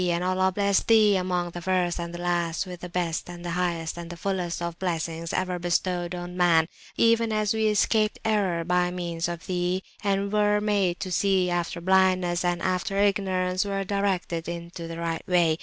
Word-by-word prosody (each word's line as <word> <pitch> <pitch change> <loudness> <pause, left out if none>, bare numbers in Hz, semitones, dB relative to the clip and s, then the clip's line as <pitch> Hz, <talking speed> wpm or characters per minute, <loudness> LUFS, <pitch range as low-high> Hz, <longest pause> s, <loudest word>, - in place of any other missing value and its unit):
And 170 +1 0
Allah 185 +1 +2
bless 200 0 +2
Thee 215 -3 +5
among 180 -2 -1
the 175 - -7
First 180 -1 0
and 170 0 -4
the 175 - -6
Last, 175 0 0
with 180 -1 -8
the 180 - -7
best, 170 -2 -2
the 175 0 -6
highest, 170 -2 -2
and 170 -1 -7
the 175 - -7
fullest 180 -2 -2
of 170 -1 -4
Blessings 165 -2 -2
ever 185 -1 -1
bestowed 175 0 -1
on 175 0 -6
Man; 170 -3 +4 0.3
even 230 0 +3
as 215 0 +1
we 220 0 +1
escaped 215 +1 +2
Error 195 -6 +1
by 180 +1 +2
means 170 -2 -3
of 170 0 -6
Thee, 180 +1 -1 0.2
and 200 0 0
were 210 0 +3
made 200 -4 +1
to 185 - -4
see 185 0 +2
after 175 0 -2
Blindness, 185 -1 +2
and 175 -1 0
after 185 +2 -1
Ignorance 190 -3 +1
were 195 -1 -2
directed 190 -4 -1
[p.318] 170 - -3
into 170 0 -8
the 165 0 -6
Right 165 -1 -2
Way. 170 -3 +3
180 Hz, 190 wpm, -26 LUFS, 175-195 Hz, 0.3 s, Thee